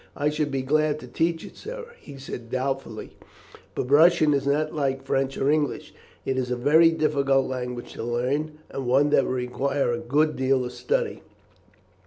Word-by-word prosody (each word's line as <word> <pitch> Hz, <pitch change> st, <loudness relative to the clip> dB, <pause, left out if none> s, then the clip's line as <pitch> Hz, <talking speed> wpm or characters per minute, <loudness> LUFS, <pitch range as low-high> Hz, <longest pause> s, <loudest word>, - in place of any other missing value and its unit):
"I 145 Hz, 0 st, +1 dB
should 150 Hz, -1 st, -1 dB
be 135 Hz, -2 st, -2 dB
glad 155 Hz, +2 st, +2 dB
to 125 Hz, -, -9 dB
teach 165 Hz, +5 st, -1 dB
it, -, -, -12 dB
sir," 480 Hz, +1 st, -8 dB
he 140 Hz, -2 st, -11 dB
said 125 Hz, -3 st, -8 dB
doubtfully, 130 Hz, -3 st, -4 dB, 0.6 s
"but 125 Hz, -, -3 dB
Russian 155 Hz, 0 st, +6 dB
is 140 Hz, 0 st, 0 dB
not 155 Hz, +2 st, +1 dB
like 135 Hz, -3 st, -1 dB
French 135 Hz, 0 st, 0 dB
or 135 Hz, -, 0 dB
English. 150 Hz, -2 st, -1 dB, 0.3 s
It 130 Hz, -1 st, 0 dB
is 125 Hz, -1 st, -2 dB
a 125 Hz, -, 0 dB
very 150 Hz, +7 st, +5 dB
difficult 140 Hz, -4 st, +2 dB
language 125 Hz, -2 st, -5 dB
to -, -, -6 dB
learn, 135 Hz, +6 st, -1 dB
and 135 Hz, -2 st, -4 dB
one 140 Hz, +4 st, +3 dB
that 140 Hz, -, +4 dB
would 130 Hz, -, -1 dB
require 130 Hz, +2 st, -1 dB
a 120 Hz, -, -2 dB
good 150 Hz, +5 st, +1 dB
deal 130 Hz, -1 st, +1 dB
of 125 Hz, -, -5 dB
study. 125 Hz, 0 st, -2 dB
135 Hz, 185 wpm, -25 LUFS, 130-150 Hz, 0.6 s, Russian